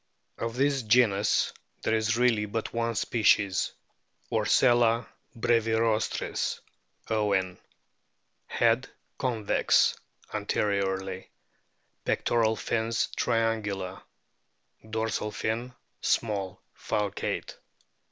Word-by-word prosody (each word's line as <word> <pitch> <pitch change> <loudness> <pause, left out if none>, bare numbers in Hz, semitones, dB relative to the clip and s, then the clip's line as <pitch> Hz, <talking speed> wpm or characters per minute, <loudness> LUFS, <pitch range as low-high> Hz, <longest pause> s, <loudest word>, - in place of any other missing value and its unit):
Of 115 0 -3
this 140 +1 +2
genus 110 -3 +3 0.3
there 110 - +1
is 110 +1 +1
really 115 -4 +2
but 110 +2 -4
one 115 0 -1
species, 100 -3 +2 0.6
Orcella 120 -1 +3 0.3
brevirostris, 115 -1 +1 0.5
Owen.* 100 -4 +1 0.9
Head - - +2 0.3
convex 120 -6 +2 0.4
anteriorly. 95 -2 -1 0.7
Pectoral 110 -2 +1
fins 115 +1 -1
triangular; 110 -5 -1 0.9
dorsal 110 -1 -1
fin 115 +4 -2 0.3
small, 100 -4 0 0.2
falcate. 105 -2 -3
110 Hz, 75 wpm, -28 LUFS, 100-115 Hz, 0.9 s, genus